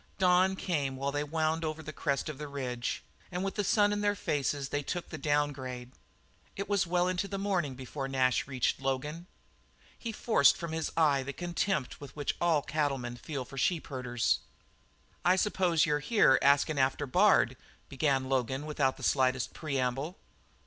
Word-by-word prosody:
Dawn 185 0 +4
came 145 -8 -1
while 140 +1 -2
they 145 +1 -1
wound 160 +2 0
over 155 0 -3
the 155 +1 -7
crest 140 -1 -1
of 150 -3 -6
the 150 - -5
range, 125 -4 -3 0.3
and 180 +1 -2
with 195 -1 -2
the 205 - -1
sun 205 +1 +3
in 205 - -1
their 205 0 +2
faces 145 -5 -1
they 145 - -1
took 175 +4 -4
the 155 - -6
downgrade. 135 -4 -1 0.6
It 200 - -4
was 200 -3 +1
well 175 +1 +2
into 185 +2 -1
the 195 - -4
morning 185 -9 -1
before 135 +2 -5
Nash 130 -1 +1
reached 130 -1 0
Logan. 150 +6 -3 0.7
He 230 - -5
forced 145 - +4
from 170 -2 -5
his 160 0 -2
eye 145 -4 +4
the 135 +2 -5
contempt 175 -4 -2
which 145 +1 -4
all 165 -4 +3
cattlemen 135 -5 -1
feel 135 +1 -5
for 135 +2 -7
sheepherders. 130 -7 0 0.8
"I 180 +2 +5
s'pose 185 -5 +2
you're 150 -2 +1
here 150 - +4
askin' 140 +1 +3
after 135 +2 +1
Bard?" 180 - +4 0.3
began 135 -2 0
Logan 130 +2 -1
without 140 -3 0
the - - -10
slightest 130 -2 +1
prelude. 140 +2 -2
145 Hz, 170 wpm, -30 LUFS, 135-175 Hz, 0.8 s, I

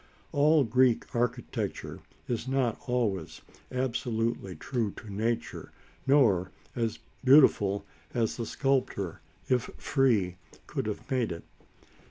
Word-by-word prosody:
All 150 +1 +5
Greek 125 0 +3
sculpture 120 0 -3 0.3
is 120 0 -2
not 130 -4 0
always 110 -9 -1 0.3
absolutely 115 -6 -1
true 115 - -1
to 105 -3 -9
nature 115 +3 -2 0.4
nor 110 -11 +4 0.3
as 115 -2 -1 0.3
beautiful 130 -7 +5 0.3
as 115 -3 0
the 115 -2 -4
sculptor, 130 - 0 0.3
if 125 -1 +1
free, 110 -10 +2 0.3
could - - -3
have 105 - -5
made 125 -6 +1
it. 85 0 -6
120 Hz, 110 wpm, -29 LUFS, 105-130 Hz, 0.4 s, All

